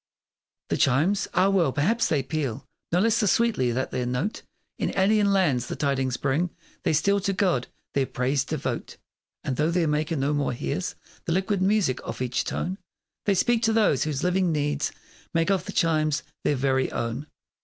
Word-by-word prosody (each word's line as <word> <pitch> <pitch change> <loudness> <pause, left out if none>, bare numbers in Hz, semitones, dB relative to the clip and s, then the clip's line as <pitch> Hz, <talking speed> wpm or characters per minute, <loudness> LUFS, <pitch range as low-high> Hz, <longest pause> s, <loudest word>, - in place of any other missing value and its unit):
The - - +1
chimes? 150 +8 +2
Ah, 190 +2 +4
well, 180 -8 +3
perhaps 195 - +1
they 145 -4 +1
peal 140 -5 -3 0.3
No 175 - +3
less 225 +1 +3
the 215 - +2
sweetly 205 - +2
that 130 +2 -2
their 125 -1 -2
note 125 - -2 0.4
In - - -2
alien 200 +1 +4
lands 145 -11 +2
the - - -4
tidings 135 -3 0
bring; 160 +9 0 0.3
They - - +1
still 200 +7 +3
to 195 0 -1
God 180 -10 +1 0.3
their 135 -2 +1
praise 130 +2 0
devote, - - -4 0.5
And 130 - -2
though 150 +2 +2
their 170 -1 +1
maker 155 +2 0
no 140 +1 0
more 145 -3 0
hears 70 - -3 0.3
The 165 - 0
liquid 190 +1 0
music 195 -8 +2
of - - -6
each 125 -1 -1
tone, 185 +3 -3 0.5
They 200 - +3
speak 235 +4 +2
to 225 -1 +2
those 210 - +3
whose 150 -3 -2
living 180 0 +2
needs 150 -1 0 0.4
Make 165 +3 +2
of 195 - +1
the - - -5
chimes 155 -3 +1 0.2
their 145 - +2
very 130 0 +1
own. 120 +6 -3
155 Hz, 185 wpm, -26 LUFS, 135-195 Hz, 0.5 s, Ah